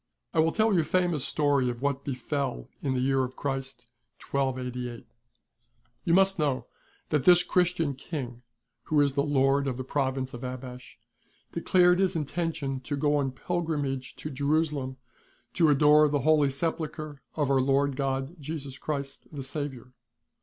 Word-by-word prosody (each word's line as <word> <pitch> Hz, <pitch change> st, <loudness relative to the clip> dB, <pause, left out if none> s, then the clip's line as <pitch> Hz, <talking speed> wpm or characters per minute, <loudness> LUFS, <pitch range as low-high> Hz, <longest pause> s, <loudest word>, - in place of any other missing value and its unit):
^ -, -, -56 dB, 0.3 s
I -, -, +1 dB
will 160 Hz, +1 st, +4 dB
tell 220 Hz, +2 st, +2 dB
you 180 Hz, -, +4 dB
a -, -, +3 dB
famous 175 Hz, -3 st, +1 dB
story 145 Hz, -4 st, +2 dB
of 120 Hz, +1 st, -5 dB
what 140 Hz, -1 st, 0 dB
befel 135 Hz, -, -3 dB
in 135 Hz, -2 st, 0 dB
the -, -, 0 dB
year 135 Hz, 0 st, +2 dB
of 130 Hz, 0 st, -5 dB
Christ, 135 Hz, -2 st, -4 dB, 0.5 s
1288. 125 Hz, -3 st, -2 dB, 1.0 s
You 170 Hz, -, +2 dB
must 195 Hz, -1 st, +4 dB
know 130 Hz, -5 st, 0 dB, 0.4 s
that 150 Hz, -4 st, +1 dB
this 175 Hz, -1 st, +7 dB
Christian 175 Hz, -5 st, +1 dB
King, 130 Hz, -4 st, -6 dB, 0.4 s
who 155 Hz, -, +2 dB
is 140 Hz, -2 st, +3 dB
the 140 Hz, -, +2 dB
Lord 140 Hz, -1 st, +2 dB
of 130 Hz, -2 st, -2 dB
the 130 Hz, -, -3 dB
Province 130 Hz, -1 st, -1 dB
of 120 Hz, +1 st, -7 dB
Abash, 125 Hz, 0 st, -7 dB, 0.5 s
declared 180 Hz, -1 st, +4 dB
his 190 Hz, -2 st, +2 dB
intention 155 Hz, -3 st, -2 dB
to 145 Hz, +3 st, -4 dB
go 145 Hz, +1 st, +2 dB
on 135 Hz, -2 st, 0 dB
pilgrimage 145 Hz, -4 st, -2 dB
to 155 Hz, -, -6 dB
Jerusalem 140 Hz, -1 st, 0 dB, 0.6 s
to 165 Hz, -3 st, +4 dB
adore 150 Hz, +1 st, +6 dB
the 145 Hz, -1 st, 0 dB
Holy 150 Hz, 0 st, +4 dB
Sepulchre 155 Hz, 0 st, -3 dB
of 145 Hz, -3 st, +1 dB
Our 135 Hz, -1 st, +4 dB
Lord 140 Hz, +1 st, +2 dB
God 135 Hz, +4 st, -2 dB
Jesus 145 Hz, -2 st, -6 dB
Christ 140 Hz, -3 st, -4 dB
the 140 Hz, -3 st, -5 dB
Saviour. 135 Hz, -3 st, -5 dB
140 Hz, 160 wpm, -28 LUFS, 130-155 Hz, 1.0 s, this